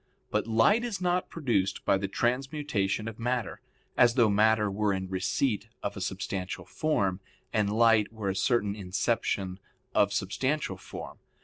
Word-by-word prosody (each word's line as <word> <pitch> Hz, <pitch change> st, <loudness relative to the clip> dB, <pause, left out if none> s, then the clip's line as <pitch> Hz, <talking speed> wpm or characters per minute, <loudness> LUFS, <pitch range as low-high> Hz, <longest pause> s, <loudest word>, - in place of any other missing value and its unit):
But -, -, 0 dB
light 115 Hz, -, +4 dB
is 230 Hz, -6 st, -3 dB
not 180 Hz, 0 st, 0 dB
produced 115 Hz, -, -1 dB
by 95 Hz, -, +3 dB
the 100 Hz, -, -2 dB
transmutation 125 Hz, -5 st, -1 dB
of 115 Hz, 0 st, -7 dB
matter, 120 Hz, 0 st, -2 dB, 0.3 s
as 120 Hz, -1 st, +5 dB
though 115 Hz, -5 st, +4 dB
matter 105 Hz, 0 st, +3 dB
were 105 Hz, 0 st, +1 dB
in 95 Hz, 0 st, -3 dB
receipt 95 Hz, +5 st, -1 dB, 0.2 s
of -, -, -3 dB
a -, -, -6 dB
substantial 90 Hz, -1 st, -4 dB
form, 100 Hz, -12 st, 0 dB, 0.3 s
and 105 Hz, -1 st, +2 dB
light 115 Hz, -1 st, +4 dB
were 105 Hz, -3 st, -2 dB
a -, -, -5 dB
certain 105 Hz, -3 st, +1 dB
inception 95 Hz, -1 st, -1 dB, 0.3 s
of 100 Hz, -, +3 dB
substantial 100 Hz, +10 st, -1 dB
form. -, -, -9 dB
110 Hz, 150 wpm, -29 LUFS, 100-125 Hz, 0.3 s, as